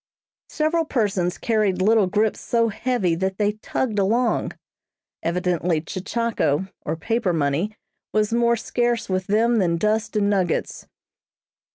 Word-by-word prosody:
Several 315 +2 +1
persons 200 - 0
carried 210 -5 +1
little 210 +1 +4
grips 210 +3 +1
so 230 -1 +1
heavy 215 -5 0
that 190 +3 -2
they 210 -1 +2
tugged 215 +1 -2
along 230 +5 +1 0.7
evidently 175 -1 0
"Chechako," 190 -1 -1
or 155 - -2
paper 225 +2 -1
money, 165 +8 -1 0.3
was 215 +1 +1
more 235 0 +3
scarce 240 0 -1
with 185 0 -1
them 230 +3 +3
than 170 -3 +1
dust 215 +4 0
and 205 -1 +2
nuggets. 190 -4 -1
210 Hz, 130 wpm, -23 LUFS, 180-230 Hz, 0.7 s, little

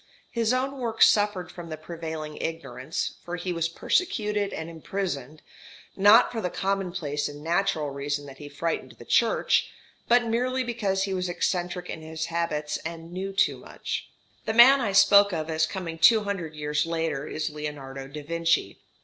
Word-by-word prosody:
His 230 -1 +1
own 265 +2 -1
work 235 -3 +2
suffered 205 -3 +3
from 175 -2 -9
the 155 - -5
prevailing 160 -1 -6
ignorance, 160 -3 -4
for 175 - -4
he 180 0 -3
was 170 0 0
persecuted 210 - 0
and 160 - -5
imprisoned, 160 -4 -5 0.5
not 205 +5 +6
for 230 -2 -3
the 180 - -1
commonplace 180 -7 -2
and 145 0 -10
natural 165 -3 0
reason 145 +1 -3
that 135 -1 -12
he 145 - -8
frightened 165 +3 -3
the - - -14
Church, - - +2 0.4
but 240 0 +4
merely 250 +3 0
because 210 -6 -1
he 195 -1 -2
was 180 -1 -2
eccentric 180 0 -2
in 160 - -6
his 160 0 -4
habits 155 -3 -1
and 165 0 -8
knew 190 +2 -3
too 195 - +2
much. - - -6 0.4
The 220 - -1
man 260 +4 +8
I 215 -5 0
spoke 200 0 +6
of 160 -1 -2
as 160 0 +2
coming 170 -4 -5
two 220 +5 +6
hundred 180 -6 -4
years 150 +1 -1
later 160 -3 -2
is 155 0 -3
Leonardo 140 -3 -6
da 150 +2 -8
Vinci. 165 +2 0
170 Hz, 170 wpm, -26 LUFS, 155-200 Hz, 0.5 s, man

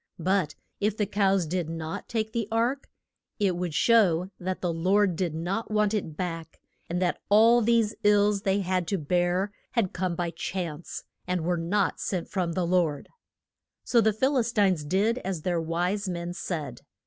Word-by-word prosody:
But 180 -3 0 0.2
if 210 +1 0
the 210 - +1
cows 195 -2 +2
did 170 0 -2
not 165 -1 -5
take 220 -2 -1
the 230 -3 -1
ark, 240 +5 0 0.5
it 195 -4 +2
would 175 -3 -3
show 190 -6 +3
that 185 +1 -3
the 175 -2 -1
Lord 185 +3 +2
did 170 -2 -2
not 185 +7 -2
want 210 -1 +2
it 160 -8 -3
back, 165 -3 -5 0.3
and 175 +1 -1
that 180 -1 0
all 225 +3 +6
these 225 -1 +2
ills 205 -1 +4
they 195 0 +1
had 185 -2 -1
to 195 - 0
bear 175 +4 0 0.2
had 225 -7 +1
come 180 -1 -1
by 170 0 -2
chance, 170 -1 -5 0.2
and 180 -1 0
were 180 0 +1
not 175 +5 0
sent 180 -4 -3
from 180 -3 -1
the 180 +1 0
Lord. 170 -5 0 0.7
So 235 - +3
the 220 0 +3
Phil 260 +6 +1
is 235 -1 0
tines 190 -8 +2
did 205 +10 +1
as 185 -7 -4
their 175 -2 0
wise 180 +5 -1
men 175 0 -4
said. 150 -9 -5
185 Hz, 180 wpm, -27 LUFS, 170-210 Hz, 0.7 s, all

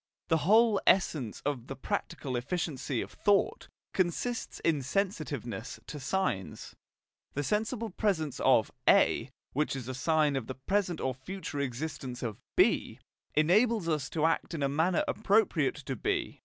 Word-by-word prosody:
The 160 - +4
whole 220 -1 +5
essence 150 - +2
of 135 -4 -2
the 135 - -5
practical 130 0 -3
efficiency 135 -1 -2
of - - -7
"thought" 205 - +1 0.3
consists 190 +7 -1
in 155 -4 +2
sensitiveness 140 - -3
to 150 - -7
signs: 130 - -2 0.6
the 145 - 0
sensible 220 - -1
presence 170 - -1
of - - +4 0.2
A, - - +4 0.2
which 150 0 0
is 125 -3 -6
a 130 - -3
sign 150 +2 +2
of 130 -4 -3
the 130 - -5
present 180 - -1
or 130 - -1
future 145 +3 -6
existence 135 -1 -4
of 110 -4 -4
B, - - +3 0.4
enables 205 +5 +3
us 150 -5 0
to 155 -1 0
act 165 +1 0
in 145 - -2
a - - +3
manner 160 +6 +2
appropriate 205 -9 +2
to 135 -2 -5
B. - - -2
155 Hz, 150 wpm, -30 LUFS, 130-190 Hz, 0.6 s, whole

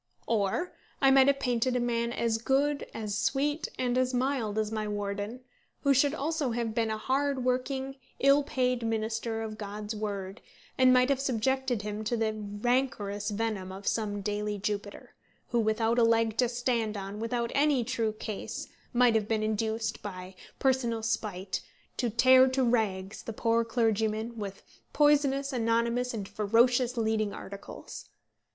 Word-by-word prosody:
Or 225 - 0 0.3
I 270 -1 +5
might 270 0 +6
have 280 0 +3
painted 250 -1 0
a - - +2
man 235 -1 0
as 230 -2 0
good, 280 +4 +1
as 210 -2 -4
sweet, 270 +7 0
and 250 0 +1
as 255 0 +1
mild 250 -5 0
as 215 0 0
my 215 -1 -2
warden, 205 +3 -4 0.4
who 280 - +4
should 280 +3 +3
also 305 -1 -1
have 230 -1 -2
been 225 0 0
a 220 - -1
hard 270 +2 0
working, 265 +2 -1 0.2
ill 275 +1 +5
paid 255 -4 0
minister 225 0 -2
of 215 0 -6
God's 210 +1 -5
word, 200 -1 -4 0.3
and 255 -1 +5
might 250 +1 +5
have 275 -2 +2
subjected 260 -2 0
him 210 +1 -4
to 235 +2 0
the 220 -1 0
rancorous 210 -1 -1
venom 205 -3 -2
of 195 +1 -8
some 205 -2 -1
daily 210 +1 -2
Jupiter, 205 0 -4 0.4
who, 240 - +1
without 225 +2 +2
a - - +5
leg 230 -1 +3
to 250 -2 +3
stand 235 -3 -1
on, 200 +1 -6
without 235 +1 -2
any 280 -3 +3
true 225 -1 -1
case, 215 -1 -6 0.2
might 245 -1 +5
have 215 -2 +1
been 220 -1 0
induced, 220 +1 -1
by 185 -2 -7 0.2
personal 245 -4 +1
spite, 205 -4 -2 0.4
to 240 - 0
tear 255 +3 +6
to 260 0 +1
rags 215 -5 0
the 225 - -6
poor 230 +1 +2
clergyman 225 0 0
with 200 -2 -6 0.3
poisonous, 280 -2 +3
anonymous, 235 +1 +1
and 205 -4 -5
ferocious 240 +4 +2
leading 220 -2 0
articles. 200 0 -9
230 Hz, 160 wpm, -29 LUFS, 215-255 Hz, 0.4 s, might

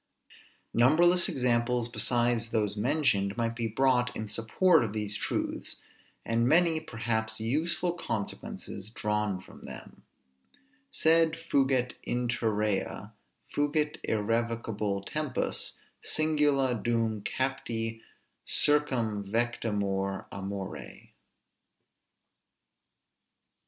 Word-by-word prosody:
Numberless 170 +9 +5
examples, 120 -1 +1
besides 120 -1 +1
those 105 -3 0
mentioned, 105 -5 +1
might 115 -1 0
be 115 -1 -1
brought 125 +2 +2
in 110 - -4
support 115 - +3
of 105 -3 -3
these 105 -1 -1
truths, - - -3 0.5
and 115 +1 +2
many 165 +2 +4
perhaps 110 -5 -2
useful 160 +10 0
consequences 105 - -5
drawn 105 -3 -1
from 95 - -15
them - - -9 0.9
Sed 160 0 +4
fugit 135 -6 +1
interea, 110 -4 -1 0.4
fugit 150 +1 0
irrevocabile 110 -2 -1
tempus, 150 -4 -2 0.3
Singula 145 -4 +2
dum 115 -2 0
capti 115 -3 -2 0.5
circumvectamur 110 -7 0
amore. 100 0 -6
115 Hz, 80 wpm, -29 LUFS, 105-135 Hz, 0.9 s, Numberless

